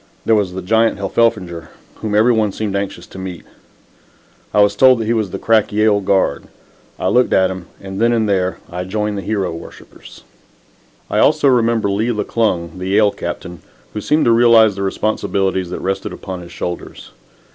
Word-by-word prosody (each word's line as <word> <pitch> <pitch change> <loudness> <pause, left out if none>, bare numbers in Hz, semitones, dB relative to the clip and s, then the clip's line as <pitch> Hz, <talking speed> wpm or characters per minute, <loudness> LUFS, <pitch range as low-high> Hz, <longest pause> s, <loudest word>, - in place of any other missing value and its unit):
There 115 - +3
was 100 -4 +1
the 95 0 -6
giant 110 +4 +2
Heffelfinger 100 -4 -1 0.3
whom 105 -1 -3
every 110 +4 +4
one 110 -2 +1
seemed 105 0 -4
anxious 100 -3 -4
to 95 - -11
meet. 90 -3 -7 1.1
I - - +1
was 100 0 +4
told 130 +2 +6
that 115 - -3
he 115 - +1
was 110 -4 -1
the - - -5
crack 110 -2 +2
Yale 105 0 +3
guard. 95 -7 0 0.5
I - - -2
looked 125 0 +2
at 95 0 +3
him, 95 -2 -8
and, 95 +1 -6
then 115 +1 +4
and 115 -2 +1
there, 95 -2 0
I 90 +1 -5
joined 105 +2 -2
the 100 - -3
hero 95 -4 -2
worshippers. 85 - -12 0.8
I - - 0
also - - +3
remember 115 -4 +2
Lee 105 +4 0
McClung, 105 -6 -1
the 90 - -4
Yale 105 +1 +3
captain, 90 -3 -7 0.3
who 105 - -4
seemed 150 +8 +1
to 115 - +4
realize 115 -2 +5
the 100 - -5
responsibilities 95 -2 -1
that - - -5
rested 95 +1 -3
upon 95 -2 -7
his 85 0 -12
shoulders. 85 0 -6
100 Hz, 185 wpm, -17 LUFS, 95-110 Hz, 1.1 s, told